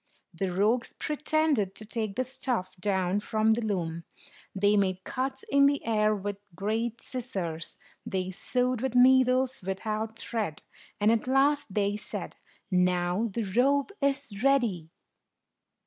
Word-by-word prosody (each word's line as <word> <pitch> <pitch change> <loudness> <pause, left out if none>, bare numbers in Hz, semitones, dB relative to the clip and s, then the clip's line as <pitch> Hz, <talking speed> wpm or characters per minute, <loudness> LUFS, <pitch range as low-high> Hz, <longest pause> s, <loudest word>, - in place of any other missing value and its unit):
The 185 +3 -2
rogues 215 +6 +1
pretended 300 - 0
to 215 - -7
take 215 -2 -3
the 255 - +1
stuff 250 -7 -3
down 190 0 0
from 220 0 +1
the 230 +1 +1
loom; 170 -6 -2 0.5
they 205 +2 +3
made 190 -2 +1
cuts 265 +1 -3
in 280 0 +5
the 285 0 0
air 215 -1 +2
with 205 0 -4 0.2
great 225 +4 -2
scissors; 185 -11 -5 0.3
they 185 -1 -2
sewed 250 +5 -1
with 260 -2 -2
needles 255 +1 +4
without 215 +4 -3
thread; 215 -10 -3 0.4
and, 210 +1 +4
at 230 +1 0
last, 275 -3 +2
they 205 0 +1
said, 210 - -6 0.4
"Now 180 +3 +2
the 230 +4 -2
robe 265 - +2
is 275 -7 -1
ready." 235 - +2
220 Hz, 135 wpm, -28 LUFS, 195-255 Hz, 0.5 s, in